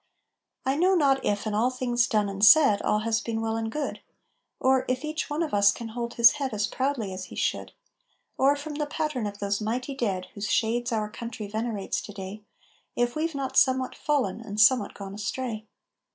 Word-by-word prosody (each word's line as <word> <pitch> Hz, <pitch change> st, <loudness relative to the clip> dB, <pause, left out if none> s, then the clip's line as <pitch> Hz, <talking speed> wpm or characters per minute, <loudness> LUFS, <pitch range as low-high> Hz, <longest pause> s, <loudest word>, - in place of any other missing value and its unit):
I 265 Hz, +2 st, +1 dB
know 370 Hz, +4 st, +4 dB
not 275 Hz, -5 st, +3 dB
if 205 Hz, +1 st, -1 dB
in 215 Hz, -, -2 dB
all 225 Hz, +4 st, +2 dB
things 245 Hz, -2 st, 0 dB
done 210 Hz, -2 st, +1 dB
and 200 Hz, 0 st, -4 dB
said 215 Hz, -4 st, +7 dB
All 210 Hz, -, +1 dB
has 220 Hz, 0 st, 0 dB
been 225 Hz, 0 st, -3 dB
well 225 Hz, 0 st, -1 dB
and 225 Hz, 0 st, -3 dB
good, 300 Hz, +2 st, -4 dB, 0.6 s
Or 260 Hz, 0 st, +3 dB
if 255 Hz, +4 st, -1 dB
each 310 Hz, +1 st, -3 dB
one 300 Hz, +3 st, -1 dB
of 315 Hz, -, -5 dB
us 200 Hz, 0 st, +5 dB
can 230 Hz, +1 st, -7 dB
hold 235 Hz, +1 st, -5 dB
his 235 Hz, -1 st, +8 dB
head 275 Hz, -6 st, -3 dB
As 210 Hz, 0 st, +1 dB
proudly 250 Hz, -5 st, -2 dB
as 185 Hz, 0 st, -6 dB
he -, -, -11 dB
should, -, -, -2 dB, 0.6 s
Or, 275 Hz, +2 st, +3 dB
from 295 Hz, +1 st, -6 dB
the 295 Hz, 0 st, -2 dB
pattern 295 Hz, -7 st, -2 dB
of 205 Hz, 0 st, -7 dB
those 200 Hz, +1 st, -2 dB
mighty 245 Hz, +6 st, -2 dB
dead 200 Hz, -8 st, -2 dB
Whose 205 Hz, 0 st, -4 dB
shades 240 Hz, +2 st, +1 dB
our 215 Hz, -2 st, 0 dB
country 230 Hz, -1 st, -6 dB
venerates 215 Hz, -1 st, -3 dB
to 205 Hz, -, -10 dB
day, 195 Hz, +1 st, -7 dB, 0.5 s
If 240 Hz, 0 st, 0 dB
we've 320 Hz, 0 st, -2 dB
not 270 Hz, -1 st, -3 dB
somewhat 260 Hz, -1 st, +3 dB
fallen 260 Hz, -9 st, -1 dB
and 210 Hz, -2 st, -6 dB
somewhat 245 Hz, +4 st, +4 dB
gone 195 Hz, -1 st, -8 dB
astray. 220 Hz, +1 st, -4 dB
235 Hz, 205 wpm, -26 LUFS, 210-270 Hz, 0.6 s, his